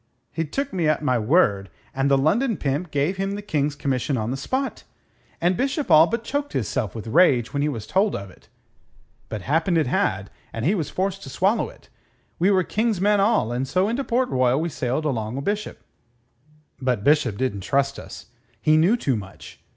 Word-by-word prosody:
He 165 - -2
took 270 - -3
me 175 -4 0
at 155 0 +1
my 130 -4 +2
word, 105 - +2 0.2
and 135 +1 0
the 140 - +4
London 210 - +1
pimp 145 +5 -2
gave 150 +6 0
him 195 +1 -2
the 205 - -5
King's 150 -6 -1
commission 135 -2 -1
on 110 +1 -2
the - - -1
spot, 260 - -3 0.6
and 175 +2 +2
Bishop 275 - -1
all 155 +2 +8
but 230 +2 -2
choked 285 +4 -3
hisself 110 -5 -2
with 110 - -6
rage 125 -2 +3
when 140 - 0
he 150 - +1
was 115 -7 -5
told 200 +2 +1
of 100 -1 -7
it. - - -22 0.8
But 105 -4 -5
happened 165 +4 +1
it 160 - +2
had, 100 -5 -1 0.2
and 115 - -3
he 180 - +3
was 165 -9 -2
forced 195 +1 -2
to - - -9
swallow 195 - +1
it. - - -18 0.5
We 180 +4 +3
were 190 -2 +3
King's 215 +1 0
men 205 +2 +3
all, 200 - +2
and 125 +2 -2
so 185 +7 +1
into 240 +5 -1
Port 250 +1 0
Royal 130 +1 +2
we 170 +2 -1
sailed 130 +1 -2
along 115 -4 -2
o' - - -2
Bishop. 205 +7 -3 1.0
But 125 -6 0
Bishop 145 -8 +2
didn't 115 -6 -2
trust 140 +6 0
us. - - -10 0.3
He 155 +6 +3
knew 180 +10 +4
too 135 - 0
much. 95 -6 -9
150 Hz, 205 wpm, -23 LUFS, 125-195 Hz, 1.0 s, all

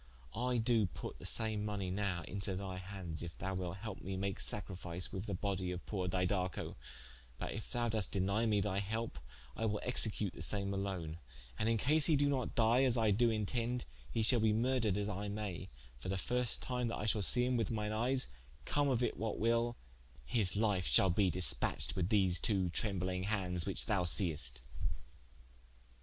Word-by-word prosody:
I 125 +1 0
doe 115 -3 +3
put - - -8
the - - -4
same 110 -2 +1
money 100 -3 -2
nowe 95 -3 -1
into 100 0 -3
thy 95 -1 -4
hands, 90 -4 -5
if 85 -1 -7
thou 95 +1 -3
wilte 90 -1 -3
helpe 110 -3 -6
mee 95 - -5
to - - -3
make 100 0 -2
sacrifice 90 -3 -2
with 95 +4 -4
the 100 - -2
bodye 95 -1 -2
of 90 0 -6
poore 95 -4 -2
Didaco: 90 0 -1 0.6
but - - -4
if - - -7
thou 120 -1 0
doest 110 -3 0
denie 100 +4 +1
me 105 -1 +3
thy 100 -1 -1
helpe 110 -4 -3 0.4
I 115 - -2
will 105 -1 -1
execute 110 -5 0
the - - -9
same 100 -1 0
alone: 95 -5 -3 0.4
and 110 - +1
in 115 - +3
case 150 +6 +3
he 160 - +4
do 145 0 +3
not 130 -3 -1
die, 115 +2 +4
as 130 -2 +3
I 110 -2 +3
do 115 +4 +4
intende, 115 +3 -1 0.3
he 115 - 0
shalbe 110 -2 +3
murdred 115 -4 +1
as 105 0 -1
I 105 0 -3
may, 100 -3 -4 0.3
for 90 - -6
the 95 - 0
first 125 +4 -1
time 125 -2 -1
that 115 - -3
I - - -3
shal 105 -1 +1
see 125 +5 +5
him 125 0 +1
with 115 -4 0
mine 105 -2 -2
eyes, 125 +4 +2 0.4
come 145 -1 +2
of 125 -2 +1
it - - -1
what 110 0 -2
will, 115 +1 +1 0.5
his 100 - +2
life 100 -5 +1
shalbe 95 +1 +4
dispatched 90 +1 +3
with 90 -1 0
these 95 -5 +4
two 95 -5 0
trembling 95 -2 0
hands 90 -5 -1
which 95 -4 +4
thou 100 -5 +1
seest." 75 - +2
105 Hz, 195 wpm, -35 LUFS, 95-115 Hz, 0.6 s, see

